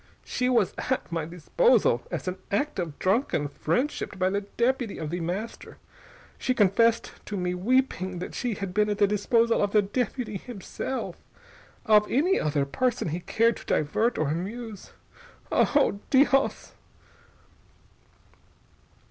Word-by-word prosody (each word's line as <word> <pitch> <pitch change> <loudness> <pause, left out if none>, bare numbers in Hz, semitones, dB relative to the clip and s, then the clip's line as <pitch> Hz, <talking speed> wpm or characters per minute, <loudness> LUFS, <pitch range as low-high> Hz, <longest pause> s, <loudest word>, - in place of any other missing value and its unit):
"She 250 0 -1
was 230 -7 +2 0.2
at 260 -8 -1
my 165 -2 -2
disposal, 180 - +2
as - - -4
an 185 +1 -3
act 245 +4 -1
of 165 -5 -4
drunken 190 - +1
friendship 200 - -2
by 185 0 +1
the 200 +1 0
deputy 235 +2 -1
of 155 -1 -5
The 175 - -2
Master. 185 +7 -5 0.6
She 255 - 0
confessed 225 +3 +3 0.2
to 205 - -3
me, 180 -1 -1
weeping, 190 -2 0
that 180 - -6
she 245 -4 -2
had 195 -3 -5
been 210 +1 +2
at 205 - -1
the 205 - +5
disposal 230 +3 +2
of 205 -1 0
the 210 -1 +5
deputy 220 +1 -2
himself. 245 +4 -5 0.7
Of 210 -2 +5
any 340 +10 +2
other 145 -2 0
person 245 - -1
he 165 +4 -2
cared 230 +5 +1
to - - -12
divert 215 +11 +1
or 155 -2 0
amuse.... 205 +6 -5 0.6
Oh! 275 -8 +3
_Dios! 275 0 +3
210 Hz, 140 wpm, -26 LUFS, 180-245 Hz, 0.7 s, the